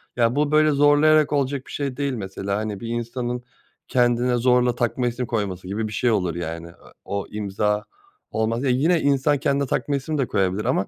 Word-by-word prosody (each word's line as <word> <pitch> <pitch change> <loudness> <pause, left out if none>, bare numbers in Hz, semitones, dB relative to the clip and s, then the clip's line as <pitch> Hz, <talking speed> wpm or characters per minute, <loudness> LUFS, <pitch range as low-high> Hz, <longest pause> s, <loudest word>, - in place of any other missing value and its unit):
Ya, 120 0 +2
bu 145 0 +1
böyle 155 0 +4
zorlayarak 145 +1 +4
olacak 140 -1 -1
bir - - -10
şey 140 -3 -3
değil 140 -1 -1
mesela, 100 -2 -3
hani, 105 -2 -4
bir 115 - -7
insanın 120 +1 -3 0.4
kendine 120 0 +2
zorla 125 0 +3
takma 120 +1 0
isim 120 +1 -2
koyması 100 -6 -3
gibi 110 +3 -2
bir 105 - -7
şey 120 +4 +1
olur 90 -6 0
yani. 85 -1 -5
E 85 - -14 0.3
o 100 0 -3
imza 105 0 -1 0.5
olmaz. 115 +2 -1
Ya, 135 - +1
yine 155 +7 +2
insan 140 +1 +2
kendine 140 0 0
takma 145 +3 -1
isim 145 +3 -2
de 135 -4 0
koyabilir 95 +1 0
ama 95 - +1
120 Hz, 195 wpm, -23 LUFS, 105-140 Hz, 0.5 s, böyle